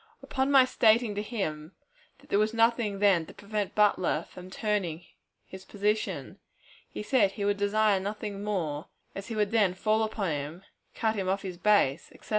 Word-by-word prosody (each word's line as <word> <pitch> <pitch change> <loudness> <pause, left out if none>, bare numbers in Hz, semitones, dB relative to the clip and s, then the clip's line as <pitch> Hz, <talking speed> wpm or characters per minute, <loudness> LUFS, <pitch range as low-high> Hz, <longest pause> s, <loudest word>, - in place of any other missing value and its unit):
Upon 265 0 -1
my 270 -2 +7
stating 225 -2 +3
to 205 - -3
him 170 -8 -4 0.4
that - - -22
there 200 - +3
was 215 +2 +1
nothing 230 -3 +2
then 195 -5 +3
to - - -13
prevent 205 -1 -4
Butler 185 -6 +2
from 180 0 -11
turning 185 -5 -2 0.4
his 190 0 -11
position, 210 +2 -2 0.5
he - - -6
said 210 -5 +2
he 200 -1 -3
would 205 0 +1
desire 205 0 +2
nothing 205 0 -5
more, 165 -8 -3 0.3
as 195 +1 -7
he 230 - -5
would 210 -1 0
then 205 -5 +2
fall 215 +3 +1
upon 215 -5 -1
him, 150 +5 -5 0.3
cut 220 -1 0
him 195 -3 -2
off 195 +1 0
from 190 - -5
his 180 - -9
base, 175 -8 +2
etc. - - -17
205 Hz, 185 wpm, -28 LUFS, 185-215 Hz, 0.5 s, my